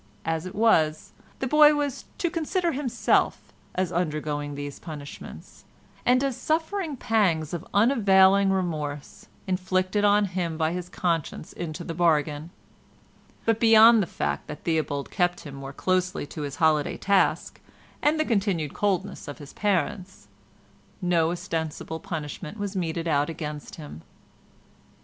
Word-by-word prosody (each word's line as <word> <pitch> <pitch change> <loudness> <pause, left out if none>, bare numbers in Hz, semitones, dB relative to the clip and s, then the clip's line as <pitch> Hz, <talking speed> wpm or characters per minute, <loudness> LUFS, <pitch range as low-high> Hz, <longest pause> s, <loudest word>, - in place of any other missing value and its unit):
As 165 +2 -1
it - - -9
was 160 -8 +2 0.3
the - - -3
boy 300 +2 +6
was 290 -3 -2
"to 345 - -1
consider 345 +1 0
himself" 270 -4 0 0.2
as 185 -1 0
undergoing 150 -4 -2
these 145 0 -6
punishments, 150 -4 -10 0.4
and 255 +2 +4
as 270 -3 0
suffering 320 +1 -1
pangs 180 -10 +1
of 170 - -3
unavailing 200 -4 +5
remorse 155 -7 -3 0.2
inflicted 185 +1 0
on 205 0 +4
him 175 -4 -3
by 160 0 +1
his 180 0 -5
conscience 165 -4 -2
into 170 0 -5
the 165 - -5
bargain; 155 -2 +1 1.0
but 225 -1 +2
beyond 225 0 +7
the 185 - -1
fact - - -3
that 150 - -8
Theobald 150 -4 -1
kept 175 -1 0
him 145 - -9
more 135 0 -7
closely 185 +3 -1
to 150 - -8
his 145 -1 -4
holiday 155 -2 +2
task, 200 0 +1 0.4
and 305 +2 +2
the 310 - +2
continued 195 - 0
coldness 200 -2 -1
of 145 - -7
his 145 -1 -11
parents, 190 -1 -2 0.7
no 175 -3 +2
ostensible 160 -2 -4
punishment 165 0 -6
was 205 -1 -4
meted 170 -2 -2
out 145 -2 +2
to 150 -2 -6
him. 145 - -9
180 Hz, 140 wpm, -26 LUFS, 155-205 Hz, 1.0 s, beyond